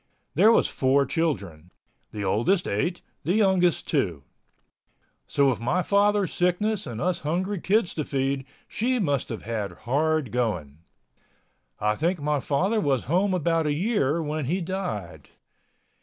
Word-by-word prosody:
There 205 +9 +6
was - - +4
four 135 +1 +2
children—the 100 - -5
oldest 145 - +1
eight, 170 - -1 0.2
the 175 - +1
youngest 190 -5 +2
two. 90 - -1 1.0
So 140 -1 +2
with 130 - +1
my 155 +10 0
father's 205 -1 +2
sickness 190 +4 0
and 115 -2 -5
us 180 +2 0
hungry 185 +6 -2
kids 210 -1 +1
to 155 - -2
feed, 135 -1 -2 0.2
she 250 +3 0
must 145 - 0
have 115 - -6
had 105 -4 -3
hard 150 0 +1
going. 90 - -2 1.0
I 105 +1 +1
think 170 - 0
my 145 0 0
father 190 - 0
was 135 - +1
home 185 +6 +1
about 165 -2 +1
a 150 - +1
year 165 - 0
when 150 -1 -2
he 175 +8 0
died. 110 - -5
155 Hz, 140 wpm, -25 LUFS, 125-185 Hz, 1.0 s, There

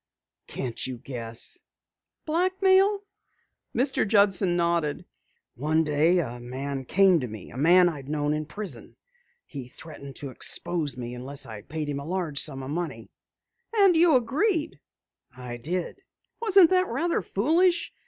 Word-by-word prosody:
"Can't 125 -2 -4
you 130 -1 -6
guess?" 115 -2 -3 0.6
"Blackmail?" 380 +4 +2 0.7
Mr. 260 -1 +1
Judson 195 -4 +3
nodded. 170 -4 0 0.5
"One 155 +5 0
day 155 +4 +2
a 125 -8 -3
man 135 +2 -5
came 190 +2 +4
to 125 - -4
me, 110 -4 -10
a - - -10
man 175 +5 +5
I 165 -4 -2
had 135 0 -11
known 150 0 -1
in 150 0 -3
prison. 205 +5 -7 0.5
He 135 -4 -8
threatened 140 0 -11
to 140 -2 -7
expose 150 +1 +1
me 120 -1 -6
unless 135 +3 -3
I 110 -2 -9
paid 150 +6 -5
him 145 -1 -3
a 140 - -8
large 170 -5 -1
sum 135 -3 0
of 130 - -6
money." 175 +2 -5 0.6
"And 395 -4 +5
you 325 -2 +5
agreed?" 310 - 0 0.6
"I 125 -1 -7
did." 175 - -4 0.4
"Wasn't 390 -6 +6
that 370 0 +3
rather 330 +8 -1
foolish? 335 - +1
160 Hz, 145 wpm, -26 LUFS, -, 0.7 s, Wasn't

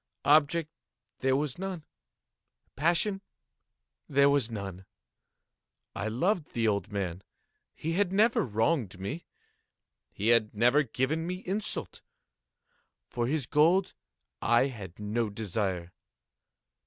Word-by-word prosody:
Object 155 +2 +4 0.5
there 130 0 +2
was 145 +1 -2
none. 185 -5 -5 0.9
Passion 175 +6 +1 0.9
there 140 0 +5
was 140 -5 +2
none. 95 -4 -6 1.1
I 105 - -2
loved 160 - 0
the 115 -1 +1
old 100 0 0
man. 95 -3 -3 0.5
He 160 - -3
had 190 +1 +1
never 215 +4 +3
wronged 110 - 0
me. 135 - -5 0.9
He 105 +3 -1
had 115 -2 +3
never 120 +7 +4
given 145 +5 -1
me 180 +1 -4
insult. 200 +3 -2 1.1
For 120 -1 -1
his 145 -1 0
gold 170 +7 +3 0.5
I 120 +2 +4
had 100 -8 -9
no 105 +2 -1
desire. 95 -4 -3
130 Hz, 110 wpm, -29 LUFS, 105-165 Hz, 1.1 s, there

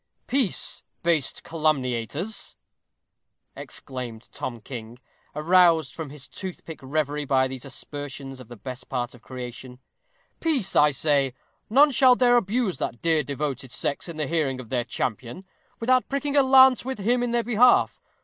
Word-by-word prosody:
_ - - -46
"Peace, 255 -6 0 0.2
base 165 -5 +2
calumniators," 155 - -2 1.0
exclaimed 125 -4 -7
Tom 120 -2 -5
King, 115 0 -8 0.4
aroused 165 -2 +4
from 160 -3 -6
his 140 -1 -9
toothpick 180 -4 -8
reverie 145 +2 -1
by 130 -2 +2
these 130 -1 -7
aspersions 140 -1 -6
of 130 - -11
the 120 - -10
best 125 +4 -8
part 125 -1 -2
of 125 - -15
creation. 125 0 -8 0.6
"Peace, 285 - 0
I 150 - +6
say. 140 -2 +1 0.3
None 285 +6 +6
shall 255 -1 +6
dare 245 -1 +4
abuse 220 -2 0
that 120 - -4
dear 165 -2 +3
devoted 140 -2 -4
sex 145 +6 -2
in 165 - -7
the 155 - -1
hearing 140 -4 -1
of 120 -3 -9
their 125 -2 0
champion, 120 - -4 0.3
without 255 +2 +2
pricking 280 +1 -1
a 285 - +7
lance 265 -1 +6
with 265 +1 -4
him 240 +5 +1
in 245 - 0
their 235 0 +1
behalf. 245 +2 +4
150 Hz, 155 wpm, -25 LUFS, -, 1.0 s, a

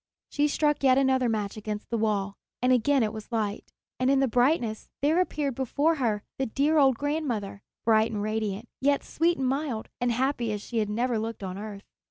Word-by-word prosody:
She 295 0 +2
struck 295 0 +1
yet 260 -2 +5
another 260 -2 +3
match 210 -2 -2
against 210 0 -5
the 230 - +1
wall, 205 -2 0 0.3
and 250 +1 +3
again 265 +1 +3
it 215 0 -1
was 215 +2 -9
light; 215 -3 -2 0.3
and 255 +1 +2
in 275 0 +4
the 270 - +3
brightness 245 -2 +1
there 315 +5 +4
appeared 295 -6 -1
before 285 +6 +1
her 220 -6 0 0.2
the 270 - 0
dear 290 +7 +2
old 265 -4 +4
grandmother, 255 -10 -2 0.2
bright 220 0 +4
and 210 - -3
radiant, 215 0 -2
yet 280 +1 +2
sweet 335 +2 +1
and 265 - -1
mild, 270 -4 -2
and 245 0 +1
happy 245 -1 0
as 210 - -3
she 235 - -2
had 210 -1 0
never 235 +2 0
looked 225 -1 -5
on 185 -1 -4
earth. 205 -1 -7
240 Hz, 205 wpm, -27 LUFS, 215-275 Hz, 0.3 s, yet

